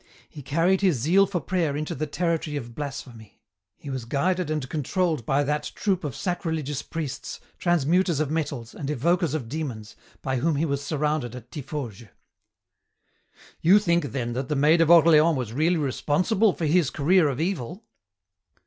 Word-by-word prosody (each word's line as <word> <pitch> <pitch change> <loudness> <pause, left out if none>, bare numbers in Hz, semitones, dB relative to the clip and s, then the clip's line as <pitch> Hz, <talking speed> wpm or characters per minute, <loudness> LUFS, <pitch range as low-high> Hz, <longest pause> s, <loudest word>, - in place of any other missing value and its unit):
He 145 - -11
carried 170 +8 +1
his 185 -8 +3
zeal 180 - +3
for 185 -2 -2
prayer 160 -2 -1
into 155 0 -3
the 155 +3 -3
territory 165 -1 -1
of 120 -4 -7
blasphemy. 130 -6 -8 0.4
He 140 - -8
was 130 -3 -4
guided 175 +7 0
and 150 -4 -2
controlled 155 - -1
by 140 +2 +2
that 150 +1 -2
troop 190 -4 0
of 140 -3 -4
sacrilegious 160 -4 -2
priests, 145 -4 -6 0.2
transmuters 175 0 +2
of 155 -2 -1
metals, 140 -7 -3
and 140 - -5
evokers 160 +3 +1
of 135 -7 -4
demons, 120 -6 -5 0.3
by 130 -1 -1
whom 155 +5 +1
he 150 +4 +1
was 140 -2 -2
surrounded 150 -4 -1
at 120 -1 -11
Tiffauges." 130 -7 -6 1.5
"You 185 +5 +6
think, 170 -5 +2
then, 125 -4 -3
that 130 +2 -4
the 150 - 0
Maid 155 +4 +4
of 165 - +3
Orleans 165 -2 +6
was 120 -4 -4
really 160 +6 +2
responsible 175 - +1
for 165 - -3
his 155 -1 +3
career 155 +2 +3
of 135 -1 -4
evil?" 175 - -3
150 Hz, 165 wpm, -25 LUFS, 135-170 Hz, 1.5 s, You